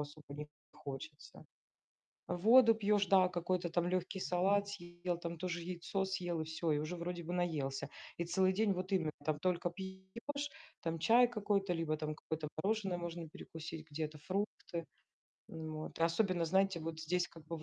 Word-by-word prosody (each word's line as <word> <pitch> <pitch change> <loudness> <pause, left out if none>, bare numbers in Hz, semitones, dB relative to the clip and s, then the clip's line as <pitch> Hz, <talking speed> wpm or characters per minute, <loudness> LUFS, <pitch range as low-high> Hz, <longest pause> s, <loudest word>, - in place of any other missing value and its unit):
особо 145 +1 -7
не 150 0 -5 0.3
хочется. 145 +2 -8 0.8
Воду 225 +5 +7
пьешь, 205 -2 +3
да, 185 -2 +6
какой-то 175 0 0
там 175 +1 +1
легкий 185 +1 -1
салат 200 +3 +3
съел, 175 -2 -4
там 170 -1 -4
тоже 175 0 -2
яйцо 175 +1 -3
съел 180 -3 -1
и - - -3
всё, 160 0 -1
и 145 - +3
уже 155 +4 -2
вроде 175 0 -3
бы 170 - -5
наелся. 150 -7 0 0.3
И - - +2
целый 185 +2 +3
день 215 -2 +4
вот 185 +2 -4
именно 165 -5 +2
там 155 -1 +1
только 175 0 +1
пьешь, 190 +11 -5 0.3
там 165 -1 -2
чай 240 +7 +6
какой-то, 205 -5 +1
либо 165 -2 0
там 155 0 -3
какое-то 160 0 -4 0.2
мороженое 195 -3 +1
можно 170 -1 -4
перекусить, 160 0 -7
где-то 155 0 -3
фрукты. 185 -2 -2 0.7
Н, 160 -1 -5
вот 155 0 -6
особенно, 170 +1 +3
знаете, 190 0 +3
вот 160 0 -4
здесь 175 +3 +1
как 165 -2 -14
бы 165 +1 -3
в - - -10
175 Hz, 170 wpm, -36 LUFS, 160-190 Hz, 0.8 s, Воду